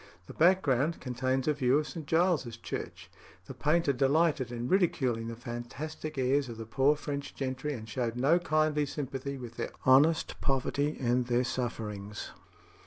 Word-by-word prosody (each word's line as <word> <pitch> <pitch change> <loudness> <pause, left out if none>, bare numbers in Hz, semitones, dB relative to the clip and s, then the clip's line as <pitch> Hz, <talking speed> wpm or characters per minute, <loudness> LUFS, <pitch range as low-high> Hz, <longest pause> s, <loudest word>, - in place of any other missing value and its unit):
The - - -10
background 165 -4 +3
contains 130 +1 -1
a 150 - +4
view 135 -2 +2
of 150 0 -1
St. 150 +1 -7
Giles's 160 -9 +1
Church. - - -6 0.4
The - - -8
painter 150 -1 +2
delighted 140 0 +2
in 120 0 -3
ridiculing 130 - +1
the 115 - -5
fantastic 130 +6 -6
airs 135 +1 +1
of 115 - -7
the 115 - -6
poor 135 +6 +3
French 145 -1 -5
gentry, 135 +2 -3
and 110 -2 -8
showed 120 0 -2
no 140 +8 +3
kindly 155 -3 +1
sympathy 140 -1 -4
with 120 -2 -9
their - - -2 0.2
honest 145 +5 +4
poverty 140 +2 0
and 125 -1 +1
their 125 0 +2
sufferings. 105 -5 -4
135 Hz, 160 wpm, -30 LUFS, 120-150 Hz, 0.4 s, a